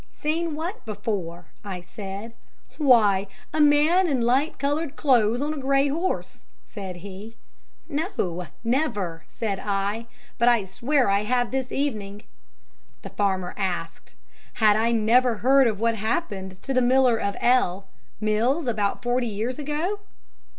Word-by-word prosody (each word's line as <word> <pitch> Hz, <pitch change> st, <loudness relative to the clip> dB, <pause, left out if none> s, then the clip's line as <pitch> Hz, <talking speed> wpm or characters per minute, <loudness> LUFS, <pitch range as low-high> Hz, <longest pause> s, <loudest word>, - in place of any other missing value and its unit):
"'"Seen 320 Hz, +1 st, -1 dB
what 340 Hz, +7 st, -5 dB
before?" 190 Hz, -6 st, -4 dB, 0.2 s
I 190 Hz, -3 st, -5 dB
said. 195 Hz, +4 st, -8 dB, 0.5 s
"'"Why, 210 Hz, -9 st, +4 dB, 0.3 s
a 310 Hz, -, +2 dB
man 300 Hz, +5 st, +5 dB
in 270 Hz, -6 st, 0 dB
light 260 Hz, +6 st, +1 dB
coloured 290 Hz, +2 st, -1 dB
clothes 245 Hz, -4 st, +3 dB
on 300 Hz, +1 st, -1 dB
a 305 Hz, -, -5 dB
grey 275 Hz, +1 st, +2 dB
horse," 335 Hz, +6 st, -2 dB, 0.2 s
said 190 Hz, -4 st, -7 dB
he. 200 Hz, +4 st, -9 dB, 0.5 s
"'"No, 285 Hz, -, -2 dB, 0.2 s
never," 225 Hz, -, -1 dB
said 205 Hz, -4 st, -3 dB
I, 205 Hz, +3 st, -2 dB, 0.3 s
"but 235 Hz, -, +3 dB
I 235 Hz, -5 st, +4 dB
swear 245 Hz, +8 st, +1 dB
I 200 Hz, 0 st, +3 dB
have 245 Hz, +1 st, +1 dB
this 260 Hz, -1 st, -2 dB
evening." 210 Hz, -8 st, -3 dB, 0.8 s
"'The -, -, -7 dB
farmer 190 Hz, -3 st, -1 dB
asked, 175 Hz, -4 st, -4 dB, 0.4 s
"Had 215 Hz, -2 st, +4 dB
I 225 Hz, +2 st, +2 dB
never 235 Hz, +2 st, +3 dB
heard 265 Hz, +4 st, +4 dB
of 215 Hz, -3 st, -1 dB
what 230 Hz, 0 st, +1 dB
happened 200 Hz, -, -3 dB
to 270 Hz, -, -2 dB
the 255 Hz, -, +3 dB
Miller 250 Hz, -1 st, +4 dB
of 200 Hz, -2 st, -2 dB
L 200 Hz, -7 st, +2 dB, 0.3 s
Mills 230 Hz, +9 st, +1 dB
about 215 Hz, -4 st, -1 dB
forty 245 Hz, 0 st, 0 dB
years 225 Hz, +5 st, -3 dB
ago?" 305 Hz, +8 st, -2 dB
235 Hz, 145 wpm, -25 LUFS, 200-275 Hz, 0.8 s, man